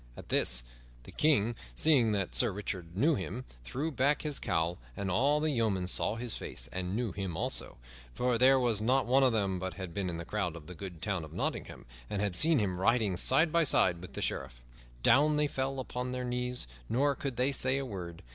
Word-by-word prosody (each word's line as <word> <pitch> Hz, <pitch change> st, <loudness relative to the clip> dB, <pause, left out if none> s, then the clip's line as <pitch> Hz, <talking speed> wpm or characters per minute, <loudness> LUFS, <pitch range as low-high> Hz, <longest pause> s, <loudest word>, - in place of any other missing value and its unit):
At -, -, -11 dB
this, -, -, +2 dB, 0.4 s
the -, -, -12 dB
King, 120 Hz, -7 st, +2 dB, 0.2 s
seeing 130 Hz, -, +4 dB
that 100 Hz, -3 st, -1 dB
Sir -, -, +3 dB
Richard 90 Hz, -3 st, -5 dB
knew 155 Hz, +9 st, +4 dB
him, 120 Hz, +2 st, -4 dB, 0.2 s
threw 140 Hz, -, -3 dB
back 140 Hz, +2 st, +1 dB
his 150 Hz, -2 st, -1 dB
cowl, 85 Hz, +2 st, -1 dB, 0.2 s
and 95 Hz, -2 st, -2 dB
all 140 Hz, +10 st, +3 dB
the 155 Hz, 0 st, 0 dB
yeomen 110 Hz, -8 st, 0 dB
saw 95 Hz, +3 st, +1 dB
his 115 Hz, -1 st, -4 dB
face -, -, -5 dB
and 90 Hz, +1 st, -3 dB
knew 120 Hz, -2 st, -1 dB
him 95 Hz, -3 st, -4 dB
also, 130 Hz, +6 st, -3 dB, 0.4 s
for 125 Hz, -2 st, +1 dB
there 135 Hz, +2 st, +6 dB
was 120 Hz, -4 st, +2 dB
not 130 Hz, +4 st, +2 dB
one 130 Hz, +3 st, +4 dB
of 130 Hz, -2 st, +4 dB
them 100 Hz, -4 st, 0 dB
but 95 Hz, +1 st, -4 dB
had 95 Hz, -3 st, -7 dB
been 95 Hz, -1 st, -2 dB
in 85 Hz, -, -4 dB
the 85 Hz, -, -6 dB
crowd 95 Hz, -5 st, -2 dB
in 80 Hz, -, -12 dB
the 90 Hz, -, -8 dB
good 85 Hz, -2 st, -8 dB
town 100 Hz, -5 st, -1 dB
of 80 Hz, -, -10 dB
Nottingham, -, -, -4 dB, 0.2 s
and 100 Hz, -, -2 dB
had 100 Hz, -3 st, -1 dB
seen 160 Hz, -, +7 dB
him 95 Hz, -6 st, -1 dB
riding 110 Hz, -1 st, +2 dB
side 150 Hz, -, +3 dB
by 170 Hz, +1 st, +4 dB
side 90 Hz, -, +3 dB
with 90 Hz, -, -10 dB
the -, -, -4 dB
Sheriff. -, -, -4 dB, 0.4 s
Down 150 Hz, +2 st, +5 dB
they 150 Hz, 0 st, +2 dB
fell 135 Hz, -1 st, -2 dB
upon 125 Hz, 0 st, -4 dB
their 125 Hz, 0 st, -3 dB
knees, 125 Hz, -, -2 dB, 0.2 s
nor 140 Hz, +4 st, +2 dB
could 135 Hz, -2 st, -5 dB
they 130 Hz, +3 st, +2 dB
say 130 Hz, 0 st, +3 dB
a 135 Hz, -, -2 dB
word. 90 Hz, -7 st, -7 dB
115 Hz, 220 wpm, -31 LUFS, 95-135 Hz, 0.4 s, seen